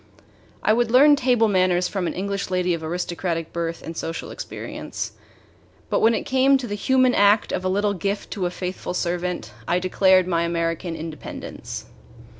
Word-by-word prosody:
I 215 - +4
would 240 0 +2
learn 285 +5 +7
table 245 -4 +3
manners 185 -2 +2
from 190 -4 -2
an - - -3
English 200 +1 -3
lady 180 -1 +1
of 165 -1 -4
aristocratic 170 0 -3
birth 170 -1 -3
and 165 - -6
social 165 0 -5
experience; - - -6 0.8
but - - +3
when 225 +1 +4
it - - -2
came 265 +1 +4
to 265 - -5
the 205 - -4
human 255 +4 +3
act 205 0 +4
of 185 - -2
a 185 - 0
little 205 +2 +1
gift 200 +2 -3
to 185 -4 -1
a - - -2
faithful 180 0 -5
servant, 180 0 -2 0.2
I 175 - +2
declared 185 0 +4
my 170 -2 +1
American 170 0 -1
independence. 160 -1 -7
185 Hz, 175 wpm, -23 LUFS, 170-210 Hz, 0.8 s, learn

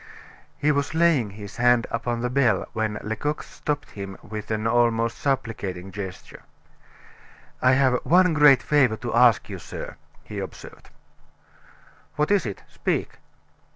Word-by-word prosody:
He 150 - +2
was 140 +1 -1
laying 160 -9 +3
his 100 0 -10
hand 120 -1 +4
upon 115 0 -2
the 125 - -1
bell, 125 -3 +2
when 110 -2 -1
Lecoq 110 +8 -3
stopped 145 -1 -4
him 100 -1 -7
with 105 0 -7
an 110 0 -2
almost 115 0 +1
supplicating 100 -9 -3
gesture. 95 -1 -8 1.2
"I 130 0 +5
have 130 -2 +2
one 180 0 +4
great 145 -3 +6
favor 135 -7 +3
to 120 +1 -5
ask 120 -2 +4
you, - - -7
sir," - - -8 0.3
he - - -7
observed. - - -9 1.3
"What 150 +3 0
is 195 - +2
it? 100 - -7
speak." - - -3
120 Hz, 140 wpm, -24 LUFS, 110-140 Hz, 1.3 s, great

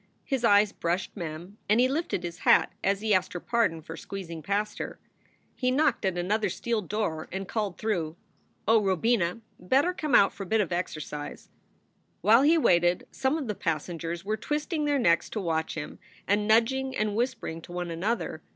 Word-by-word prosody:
His 265 -4 -2
eyes 205 -2 +5
brushed 175 +1 -2
Mem 175 +2 -7
and 215 +3 +4
he 250 - +5
lifted 275 - -2
his 170 -1 -6
hat - - +4
as 195 +1 +1
he 215 -1 +2
asked 185 -1 +1
her 175 - -3
pardon 205 -8 0
for - - -8
squeezing 170 -5 -7
past 200 +6 -2
her. - - -5 0.6
He 255 - 0
knocked 280 -3 +2
at 185 -2 0
another 205 +4 0
steel 230 +4 -1
door 180 -5 -2
and 190 +1 -4
called 210 -4 -2
through, 170 -8 -2 0.5
"Oh, 225 0 +5
Robina, 190 +1 +1 0.2
better 275 - +2
come 305 -4 0
out 195 - +6
for 200 - -10
a - - -3
bit 220 +4 +2
of 190 -4 0
exercise." 155 -4 -5 0.7
While 220 +6 +6
he 315 +4 +5
waited, 175 - +3
some 270 +3 0
of 300 - -3
the 210 - -1
passengers 170 0 -3
were 215 +1 -1
twisting 300 +3 -2
their 290 -1 +2
necks 170 -10 +3
to 220 - -3
watch 160 -4 -1
him, 155 -2 -6 0.3
and 210 +1 +2
nudging 260 +4 +2
and 215 -1 0
whispering 225 -9 -2
to 175 - -12
one 175 -1 -4
another. 200 +8 -2
205 Hz, 190 wpm, -28 LUFS, 175-235 Hz, 0.7 s, out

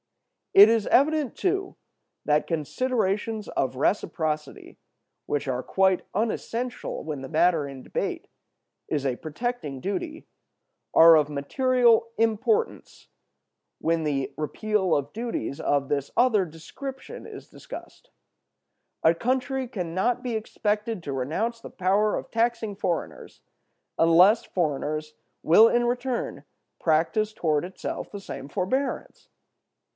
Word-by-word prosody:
It 200 +2 +11
is 225 -2 +2
evident, 295 0 +3
too, 385 0 -1 0.5
that 150 0 +2
considerations 210 - -1
of 130 -1 -1
reciprocity, 155 -2 -2 0.5
which 145 0 -1
are 130 -1 -2
quite 190 -1 +2
unessential 230 +3 -3
when 150 -3 -5
the 135 - -7
matter 160 -2 +2
in 135 -2 -9
debate - - -3 0.6
is 145 -2 -1
a 130 -2 0
protecting 155 - -4
duty, 315 - -4 0.7
are 165 0 +9
of 150 -2 +3
material 235 - +2
importance 230 - 0 0.7
when 165 0 0
the 140 -3 -1
repeal 190 +4 0
of 140 0 -1
duties 230 - -4
of 140 -1 +1
this 140 -1 -2
other 225 -6 +4
description 260 - -9
is - - -10
discussed. - - -11 0.9
A 160 - +6
country 260 +6 -1
can 180 -8 -5
not 240 +7 +1
be 250 -2 -3
expected 215 -1 -2
to 140 - -4
renounce 200 - -2
the - - -9
power 200 +3 +1
of - - -7
taxing 230 -2 0
foreigners 185 -4 -4 0.6
unless 180 +7 +6
foreigners 155 -2 -2 0.3
will 215 +8 +7
in 240 0 +2
return 245 0 -2 0.4
practice 175 +7 +1
toward 155 -8 0
itself 185 +2 -6
the 205 - -6
same 140 -7 -8
forbearance. 255 - -3
195 Hz, 120 wpm, -26 LUFS, 155-235 Hz, 0.9 s, It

